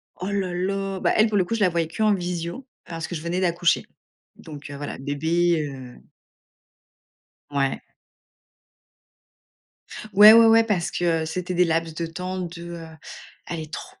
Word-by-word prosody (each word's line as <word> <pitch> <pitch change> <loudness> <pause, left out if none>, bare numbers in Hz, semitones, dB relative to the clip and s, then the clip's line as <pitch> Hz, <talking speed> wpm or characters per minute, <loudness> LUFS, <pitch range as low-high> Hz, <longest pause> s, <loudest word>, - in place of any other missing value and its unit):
Oh 185 +3 -5
là 190 -3 -2
là, 195 +1 -2
bah, - - +1
elle, 215 - +5
pour 215 -2 0
le 185 - +2
coup, 230 - -2
je 225 - -3
la 190 - +4
voyais 165 -2 -1
qu'en 215 +5 +1
visio 175 +6 -4 0.2
parce 165 -1 -6
que 175 - -6
je 155 - -5
venais 170 +3 -2
d'accoucher, 175 -1 +1 0.5
donc 150 -2 -11
heu, 145 - -7
voilà, 145 0 -6
bébé, 160 +4 0
heu 130 -3 -10 1.5
Ouais. 135 -1 -1 2.3
Ouais, 210 +2 +10
ouais, 230 0 +8
ouais, 225 0 +6
parce 200 -6 -1
que 165 -2 0
c'était 180 +3 -4
des 180 0 +3
laps 165 0 -1
de 170 - -3
temps 180 +3 -5
de 170 -1 -7 0.6
aller 160 -2 -5
tro - - -8
175 Hz, 160 wpm, -23 LUFS, 165-190 Hz, 2.3 s, Ouais